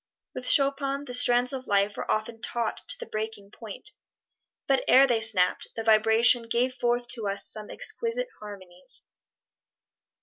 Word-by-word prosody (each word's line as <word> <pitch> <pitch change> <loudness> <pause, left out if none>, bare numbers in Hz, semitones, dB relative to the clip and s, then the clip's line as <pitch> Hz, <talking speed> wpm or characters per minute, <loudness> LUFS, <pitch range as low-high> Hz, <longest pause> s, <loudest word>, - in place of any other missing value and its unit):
With 250 0 -6
Chopin 275 0 +1
the 250 - -8
strands 245 +1 +3
of 260 -1 -7
life 200 0 +1
were - - -7
often 225 +1 -3
taut 235 -2 -3
to - - +2
the - - -8
breaking 215 -2 -7
point, 225 - -11 0.7
but 270 -1 0
ere 270 +1 +6
they 240 -4 0
snapped, 200 -5 +1
their 225 - -6
vibration 225 +2 +4
gave 245 +3 0
forth 240 -1 -2
to 230 -4 -1
us 200 0 +1
some 215 -1 -1
exquisite 485 +2 0
harmonies. 185 -4 -9
230 Hz, 155 wpm, -26 LUFS, 215-255 Hz, 0.7 s, ere